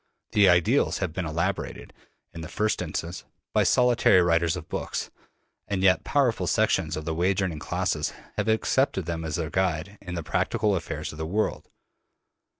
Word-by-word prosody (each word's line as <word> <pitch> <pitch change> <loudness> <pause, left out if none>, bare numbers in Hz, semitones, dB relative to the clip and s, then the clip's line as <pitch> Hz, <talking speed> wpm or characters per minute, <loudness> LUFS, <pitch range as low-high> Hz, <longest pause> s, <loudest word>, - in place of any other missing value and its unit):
The 100 -3 +5
ideals 90 -2 +3
have 80 - -3
been 90 -1 -3
elaborated, 85 +5 -3 0.4
in 85 - -7
the 80 - -6
first 110 +1 0
instance, 85 +2 -4 0.3
by - - +4
solitary 120 -6 +4
writers 85 0 +2
of 85 -3 -7
books, - - -4 0.6
and 95 -2 -1
yet 95 -1 +4
powerful 135 -6 +1
sections 95 -8 +1
of 80 - -5
the 80 - -1
wage 90 +4 +1
earning 85 -5 -2
classes 70 - -1 0.2
have 105 +1 -1
accepted 110 - +1
them 85 -1 -3
as 80 -2 -3
their 80 -2 -3
guide 95 +1 -1
in 90 -2 -6
the 85 - -3
practical 100 +6 0
affairs 85 - -4
of 75 - -11
the 80 - -3
world. 105 +6 -1
90 Hz, 170 wpm, -26 LUFS, 80-100 Hz, 0.6 s, The